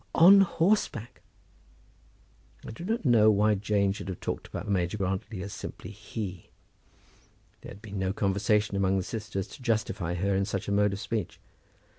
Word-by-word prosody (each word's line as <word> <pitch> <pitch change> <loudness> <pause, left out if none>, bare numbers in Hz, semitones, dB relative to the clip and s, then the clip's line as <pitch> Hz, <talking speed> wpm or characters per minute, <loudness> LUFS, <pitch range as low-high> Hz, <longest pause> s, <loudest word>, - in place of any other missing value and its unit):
on 195 +4 +8
horseback." 170 - 0 1.4
I - - -6
do 115 - -9
not 220 0 -2
know 115 -4 +6
why 105 +1 +4
Jane 100 0 +1
should 95 - -6
have 95 -2 -5
talked - - -4
about - - -6
Major 95 -1 0
Grantly 95 0 -3
as 100 - -7
simply - - -8
"he." 100 -3 -7 1.1
There - - -10
had 100 +2 -12
been 100 -2 -6
no 95 0 0
conversation 105 +1 +1
among 95 0 +2
the 95 - -1
sisters 105 -2 -4
to - - -12
justify 110 -7 -1
her 100 +3 0
in 95 0 +1
such 100 0 -4
a - - -1
mode 100 0 +2
of 100 - -4
speech. 110 -3 -4
105 Hz, 170 wpm, -28 LUFS, 95-110 Hz, 1.4 s, on